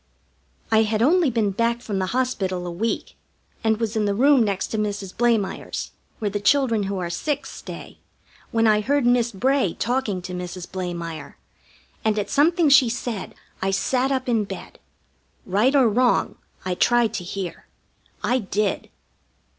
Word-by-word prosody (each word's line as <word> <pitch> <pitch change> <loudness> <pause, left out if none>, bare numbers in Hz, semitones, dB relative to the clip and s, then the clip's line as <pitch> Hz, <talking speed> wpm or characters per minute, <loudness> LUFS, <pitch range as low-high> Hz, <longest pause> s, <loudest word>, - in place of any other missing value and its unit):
I 220 0 +5
had 220 0 +1
only 330 +2 +4
been 220 -4 +1
back 230 +4 0
from 210 -5 -3
the 185 - -1
hospital 190 -7 -1
a 175 - -4
week, 220 +7 -3 0.5
and 220 -1 +2
was 225 -1 -2
in 215 -1 +1
the 200 -1 0
room 270 +3 +5
next 200 -3 -1
to 220 - -2
Mrs. 200 -3 -3
Blamire's, 230 -4 0 0.3
where 210 -2 -2
the 205 - -2
children 230 -1 +2
who 200 - -2
are 175 -2 -3
sick 285 - -2
stay, - - -9 0.5
when 225 0 +2
I 215 -1 +4
heard 280 +3 +1
Miss 240 -1 +3
Bray 250 -1 +1
talking 225 -6 -1
to 180 0 -6
Mrs. 180 0 -5
Blamire, 175 -3 -5 0.7
and 215 -1 +1
at 205 - -2
something 330 +3 +3
she 275 -3 +6
said 235 -3 -4 0.3
I 190 - +1
sat 255 +7 +1
up 260 -1 -1
in 230 -3 +2
bed. - - -9 0.7
Right 210 +9 +2
or 265 -4 +6
wrong, 245 +3 +2 0.3
I 185 - 0
tried 240 +4 +3
to 180 - -3
hear. 180 0 -6 0.6
I 250 +2 +2
did. 205 -1 -1
220 Hz, 165 wpm, -23 LUFS, 195-250 Hz, 0.7 s, she